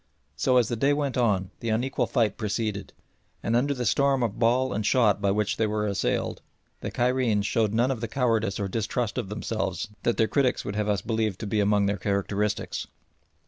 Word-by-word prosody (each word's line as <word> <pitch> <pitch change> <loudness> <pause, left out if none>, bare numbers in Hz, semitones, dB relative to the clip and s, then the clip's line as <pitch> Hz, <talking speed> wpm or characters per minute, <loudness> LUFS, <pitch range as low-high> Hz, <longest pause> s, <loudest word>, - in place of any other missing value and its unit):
So 130 - +2
as 120 -4 +4
the 120 - -2
day 140 +5 +2
went 145 -2 -1
on 100 -7 +1
the 115 - -3
unequal 120 +5 0
fight 110 -6 +1
proceeded, 105 -2 -3 0.5
and 115 - +1
under 135 +4 +2
the 125 -1 -3
storm 135 +2 +2
of 115 -2 -2
ball 125 +2 +2
and 110 - -1
shot 105 -3 +3
by 100 - +2
which 105 +1 0
they 110 - +2
were 105 0 -1
assailed 100 -1 -1 0.4
the - - -4
Cairenes 120 -4 +1
showed 110 -1 +1
none 120 +4 +2
of 120 -4 -3
the 115 - -2
cowardice 115 -5 0
or 100 - -1
distrust 110 +2 -2
of 95 - -4
themselves 105 -1 -3
that 120 - 0
their 110 - +3
critics 130 -1 +1
would 100 - -4
have 105 0 0
us 100 -3 0
believe 110 -4 -1
to 110 - -6
be 105 +1 0
among 105 0 +3
their 100 +1 0
characteristics. 100 +1 -1
110 Hz, 205 wpm, -26 LUFS, 105-125 Hz, 0.5 s, as